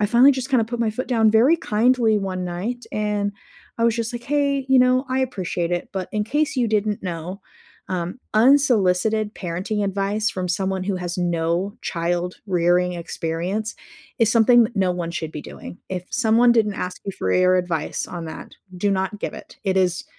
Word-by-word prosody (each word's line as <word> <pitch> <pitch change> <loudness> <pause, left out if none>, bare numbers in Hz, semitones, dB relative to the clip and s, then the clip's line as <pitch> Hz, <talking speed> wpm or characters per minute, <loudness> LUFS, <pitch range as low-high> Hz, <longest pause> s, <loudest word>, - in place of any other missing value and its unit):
I 210 - +3
finally 245 +6 +6
just 260 +1 -4
kinda 250 -4 +3
put 235 +1 -5
my 225 -2 +1
foot 250 +4 -4
down 225 -3 +4
very 245 +10 +5
kindly 225 -3 +2
one 185 -2 -3
night 205 +8 -4
and 210 -1 -1 0.5
I 230 - +2
was 235 0 +2
just 230 0 -2
like, 240 0 -6
"Hey, 280 -1 0
you 265 - +5
know, 255 +1 +3
I 260 +1 0
appreciate 185 -8 -2
it, 175 - -2
but 190 -2 -4
in 210 0 0
case 290 +4 0
you 240 -3 +1
didn't 210 -1 0
know, 180 +2 -5 0.5
um, 180 +4 -3 0.2
unsolicited 220 -4 +3
parenting 190 +4 -3
advice 200 +2 0
from 180 -1 -4
someone 190 +1 -1
who 195 -1 -1
has 175 -1 -4
no 175 +3 -1
child 175 +1 -2
rearing-experience 180 +2 -1 0.4
is 225 -2 +4
something 235 0 +5
no 190 -2 +2
one 175 -2 -3
should 160 -2 -5
be 150 - -5
doing. - - -10
If 180 -1 -4
someone 240 -1 +4
didn't 215 -3 +2
ask 180 -1 -5
you 195 - -2
for 95 - -2
your 185 0 +4
advice 175 -4 -2
on 170 -2 -6
that, 160 - -9 0.2
do 200 +3 0
not 195 +2 -1
give - - -4
it. - - -12
It 190 -1 +1
is 180 -1 +1
205 Hz, 185 wpm, -22 LUFS, 180-235 Hz, 0.5 s, finally